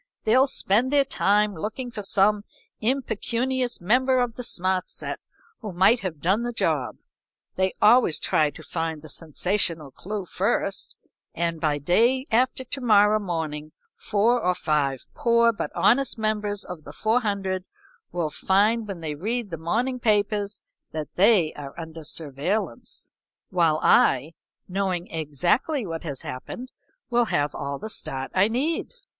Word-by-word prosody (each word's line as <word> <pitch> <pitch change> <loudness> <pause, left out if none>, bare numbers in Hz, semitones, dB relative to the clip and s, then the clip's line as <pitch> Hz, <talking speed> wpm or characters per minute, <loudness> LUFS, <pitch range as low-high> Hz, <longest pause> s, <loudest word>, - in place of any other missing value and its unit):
"They'll 255 +5 +4
spend 235 -1 +3
their 285 -1 +4
time 210 -3 +2
looking 220 +8 -5
for 215 - -5
some 205 +1 +2 0.4
impecunious 245 +1 -1
member 255 +8 +2
of 245 -2 0
the 250 - -7
smart 185 -5 0
set - - -4 0.4
who 215 -3 -6
might 195 +7 +4
have 175 -6 -5
done 190 +9 +2
the 240 0 -2
job. 230 - -1 0.6
They 190 0 +1
always 220 -6 +5
try 155 -1 +2
to - - -12
find 160 -2 -3
the 155 - -11
sensational 165 -1 0
clew 200 +6 -5
first, - - -1 0.4
and 170 -1 -2
by 150 -3 +1
day 230 - +2
after 255 +3 +2
to 265 +2 -5
morrow 215 -2 +5
morning 155 -5 -4 0.2
four 225 +4 +1
or 180 0 +2
five 140 -6 -1
poor 235 -1 +3
but - - -4
honest 255 +2 +3
members 210 -2 -1
of 180 -4 -8
the - - -10
four 225 +3 +1
hundred 195 -4 -2 0.5
will 165 -3 -2
find 210 +7 +2
when 190 -4 -6
they 155 -2 -3
read 215 +7 -3
the 165 - -4
morning 240 +10 -1
papers 210 -2 +1 0.3
that 155 -1 -6
they 185 -5 +4
are 145 +2 -9
under 160 -1 -8
surveillance, 155 - -3 0.4
while 165 -4 +2
I, 140 +6 +4 0.3
knowing 185 -2 -2
exactly 175 - 0
what 165 -3 -5
has 145 -4 -3
happened 245 - -7 0.4
will 240 0 +3
have 145 -8 0
all 140 0 -4
the 215 - -7
start 135 -10 -4
I 190 +2 +4
need. 290 - -2
200 Hz, 150 wpm, -25 LUFS, 165-230 Hz, 0.6 s, always